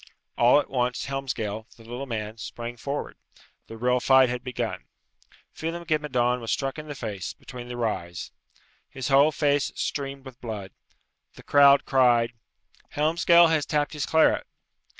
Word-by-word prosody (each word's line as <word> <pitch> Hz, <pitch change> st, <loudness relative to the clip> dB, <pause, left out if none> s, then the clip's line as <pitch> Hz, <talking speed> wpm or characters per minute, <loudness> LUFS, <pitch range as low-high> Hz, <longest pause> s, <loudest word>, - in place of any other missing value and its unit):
All 120 Hz, +4 st, +5 dB
at -, -, -3 dB
once, 125 Hz, -1 st, -1 dB
Helmsgail, 115 Hz, -6 st, -4 dB
the 115 Hz, -, -15 dB
little 120 Hz, +4 st, -6 dB
man, 110 Hz, -2 st, -5 dB
sprang 120 Hz, +2 st, -6 dB
forward. 140 Hz, +4 st, -5 dB, 0.5 s
The 115 Hz, -, -9 dB
real 125 Hz, +2 st, +2 dB
fight 130 Hz, 0 st, +5 dB
had 125 Hz, 0 st, -4 dB
begun. 125 Hz, -2 st, -4 dB, 0.7 s
Phelem 165 Hz, +2 st, -4 dB
ghe 155 Hz, -1 st, +1 dB
Madone 125 Hz, -4 st, 0 dB
was 115 Hz, -, -3 dB
struck 135 Hz, +2 st, -2 dB
in 150 Hz, -, -9 dB
the 145 Hz, -, -6 dB
face, 105 Hz, -7 st, -5 dB
between 125 Hz, -2 st, -10 dB
the 120 Hz, 0 st, -6 dB
Ryes. 85 Hz, -7 st, -3 dB, 0.6 s
His 130 Hz, +1 st, -5 dB
whole 140 Hz, +3 st, +5 dB
face 145 Hz, -4 st, +1 dB
streamed 140 Hz, -1 st, -4 dB
with 130 Hz, -2 st, -12 dB
blood. 105 Hz, -5 st, -6 dB, 0.6 s
The -, -, -14 dB
crowd 140 Hz, -1 st, +6 dB
cried, 120 Hz, -3 st, +3 dB, 0.6 s
"Helmsgail 170 Hz, +2 st, +5 dB
has 155 Hz, -3 st, +1 dB
tapped 150 Hz, -1 st, 0 dB
his 150 Hz, -2 st, -3 dB
claret!" 160 Hz, 0 st, +3 dB
130 Hz, 155 wpm, -26 LUFS, 120-145 Hz, 0.7 s, crowd